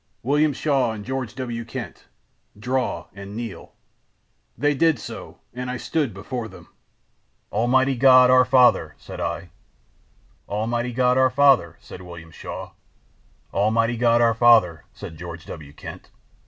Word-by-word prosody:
William 145 Hz, +4 st, +2 dB
Shaw 135 Hz, -4 st, 0 dB
and 105 Hz, -2 st, -8 dB
George 130 Hz, -3 st, -4 dB
W. 120 Hz, -3 st, -4 dB
Kent, 115 Hz, -5 st, -8 dB, 0.5 s
draw 125 Hz, -7 st, -2 dB
and 100 Hz, +1 st, -9 dB
kneel.' 115 Hz, -3 st, -7 dB, 0.8 s
"They 145 Hz, +5 st, +2 dB
did 160 Hz, +1 st, +2 dB
so -, -, -9 dB, 0.2 s
and 125 Hz, +1 st, -5 dB
I 125 Hz, -, -3 dB
stood 145 Hz, 0 st, -1 dB
before 110 Hz, +5 st, -6 dB
them. -, -, -15 dB, 0.8 s
"'Almighty 130 Hz, +5 st, +2 dB
God, 130 Hz, 0 st, +6 dB
our 130 Hz, 0 st, +6 dB
Father,' 125 Hz, -, +3 dB
said -, -, -10 dB
I. -, -, -4 dB, 1.0 s
"'Almighty 120 Hz, +4 st, -2 dB
God, 125 Hz, +1 st, +2 dB
our 130 Hz, 0 st, +4 dB
Father,' 130 Hz, -, +3 dB
said 90 Hz, -, -11 dB
William 85 Hz, -2 st, -11 dB
Shaw. -, -, -8 dB, 0.8 s
"'Almighty 115 Hz, +4 st, +1 dB
God, 120 Hz, 0 st, +3 dB
our 115 Hz, -1 st, +4 dB
Father,' 115 Hz, -8 st, +4 dB
said 80 Hz, -, -10 dB
George 85 Hz, 0 st, -9 dB
W. 75 Hz, -4 st, -9 dB
Kent. -, -, -11 dB
120 Hz, 140 wpm, -23 LUFS, 105-130 Hz, 1.0 s, God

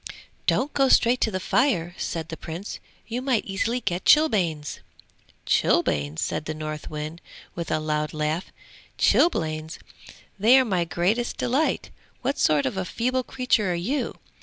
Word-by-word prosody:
'Don't 280 Hz, +3 st, +1 dB
go 270 Hz, -1 st, +3 dB
straight 245 Hz, +1 st, +4 dB
to -, -, +3 dB
the 185 Hz, -3 st, -2 dB
fire,' 185 Hz, -, +1 dB
said 165 Hz, -3 st, -4 dB
the 160 Hz, -, -4 dB
Prince. 170 Hz, +5 st, -7 dB, 0.3 s
'You 235 Hz, +2 st, -4 dB
might 255 Hz, -4 st, +1 dB
easily 215 Hz, +5 st, -1 dB
get 180 Hz, -4 st, -2 dB
chilblains!' 180 Hz, -, +3 dB, 0.7 s
'Chilblains!' 75 Hz, +1 st, +1 dB
said -, -, -2 dB
the 155 Hz, -, -4 dB
Northwind 155 Hz, +1 st, -6 dB, 0.3 s
with 170 Hz, -1 st, -5 dB
a 155 Hz, -, +1 dB
loud 150 Hz, -1 st, -1 dB
laugh. 155 Hz, +3 st, -2 dB, 0.5 s
'Chilblains! 155 Hz, -, +2 dB, 0.6 s
they 230 Hz, +6 st, +7 dB
are 260 Hz, -, +4 dB
my 185 Hz, -6 st, 0 dB
greatest 195 Hz, +8 st, 0 dB
delight! 270 Hz, +6 st, 0 dB, 0.3 s
What 275 Hz, +3 st, -1 dB
sort 150 Hz, -2 st, +3 dB
of -, -, -2 dB
a 190 Hz, -, 0 dB
feeble 255 Hz, +7 st, -1 dB
creature 250 Hz, -6 st, 0 dB
are -, -, 0 dB
you? 240 Hz, +10 st, -2 dB
185 Hz, 150 wpm, -25 LUFS, 155-245 Hz, 0.7 s, they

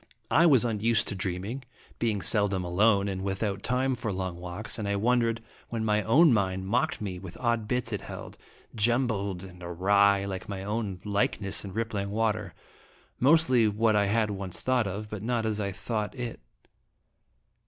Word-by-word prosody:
I 170 Hz, -, +6 dB
was 130 Hz, -6 st, +5 dB
unused 115 Hz, 0 st, +1 dB
to 100 Hz, -, -2 dB
dreaming, 95 Hz, +7 st, -3 dB, 0.4 s
being 105 Hz, -5 st, 0 dB
seldom 100 Hz, -1 st, +2 dB
alone 100 Hz, +3 st, +3 dB
and 95 Hz, -1 st, -3 dB
without 100 Hz, 0 st, -2 dB
time 130 Hz, +3 st, 0 dB
for 115 Hz, -4 st, -3 dB
long 95 Hz, -2 st, -3 dB
walks, 90 Hz, +6 st, -4 dB
and 105 Hz, -, -3 dB
I 100 Hz, -, 0 dB
wondered 115 Hz, +1 st, +1 dB, 0.3 s
when 115 Hz, -1 st, -2 dB
my 105 Hz, 0 st, +2 dB
own 140 Hz, -, +5 dB
mind 95 Hz, -3 st, 0 dB
mocked 115 Hz, +4 st, 0 dB
me 95 Hz, -4 st, -4 dB
with 90 Hz, -2 st, -9 dB
odd 115 Hz, -3 st, 0 dB
bits 125 Hz, -1 st, -1 dB
it 105 Hz, -, -2 dB
held, -, -, -8 dB, 0.4 s
jumbled 110 Hz, -5 st, 0 dB
and 90 Hz, -2 st, -12 dB
awry, 100 Hz, +3 st, +3 dB
like 95 Hz, -1 st, -5 dB
my 95 Hz, -1 st, -4 dB
own 105 Hz, -3 st, -3 dB
like 100 Hz, 0 st, 0 dB
ness 100 Hz, -2 st, -1 dB
in 100 Hz, -, -7 dB
rippling 110 Hz, -3 st, -2 dB
water, 105 Hz, -2 st, -1 dB, 0.6 s
mostly 130 Hz, -5 st, +4 dB
what 110 Hz, +1 st, +2 dB
I 100 Hz, -1 st, +3 dB
had 110 Hz, 0 st, +1 dB
once 95 Hz, -2 st, -5 dB
thought 125 Hz, -4 st, +1 dB
of, 100 Hz, +3 st, -4 dB
but 105 Hz, -2 st, -6 dB
not 115 Hz, 0 st, -1 dB
as 110 Hz, -1 st, -1 dB
I 100 Hz, -1 st, -1 dB
thought 105 Hz, +4 st, -3 dB
it. 120 Hz, -3 st, -5 dB
105 Hz, 175 wpm, -28 LUFS, 100-115 Hz, 0.6 s, I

